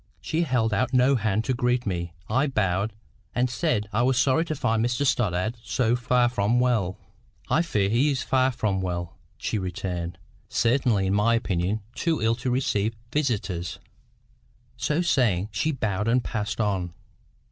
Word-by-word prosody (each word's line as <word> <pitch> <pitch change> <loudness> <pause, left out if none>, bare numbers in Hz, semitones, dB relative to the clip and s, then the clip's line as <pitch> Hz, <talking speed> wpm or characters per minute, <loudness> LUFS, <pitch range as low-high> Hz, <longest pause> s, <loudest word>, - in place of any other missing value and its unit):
She 160 - -1
held 125 -8 +1
out 130 +5 0
no 130 +2 +5
hand 110 -2 0
to 130 - 0
greet 125 0 0
me. 85 -4 -2 0.2
I 130 +6 +2
bowed, 100 -4 0 0.4
and 125 +1 +1
said 125 -7 0
I 115 - +2
was 130 +1 +2
sorry 135 +5 +3
to 155 - -3
find 115 -5 +1
Mr 120 +4 0
Stoddart 110 -2 +1
so 120 0 +1
far 125 0 +2
from 120 0 +1
well. 110 -7 +1 0.5
"I 160 - +4
fear 105 - +1
he 120 +8 +3
is 135 -2 -1
far 130 0 +2
from 110 -6 -1
well," 85 -2 -3 0.2
she 110 - -2
returned; 90 -2 -4 0.3
"certainly 115 -4 +2
in 95 - +1
my 110 +3 +3
opinion 100 -1 -1
too 165 -2 0
ill 115 +1 +2
to 125 +1 -2
receive 115 -4 0 0.2
visitors." 105 - -1 1.0
So 155 +4 0
saying, 110 - +2
she 115 +10 0
bowed 105 -6 -1
and 120 +2 +3
passed 105 -1 -3
on. 95 -5 -1
115 Hz, 165 wpm, -25 LUFS, 100-125 Hz, 1.0 s, no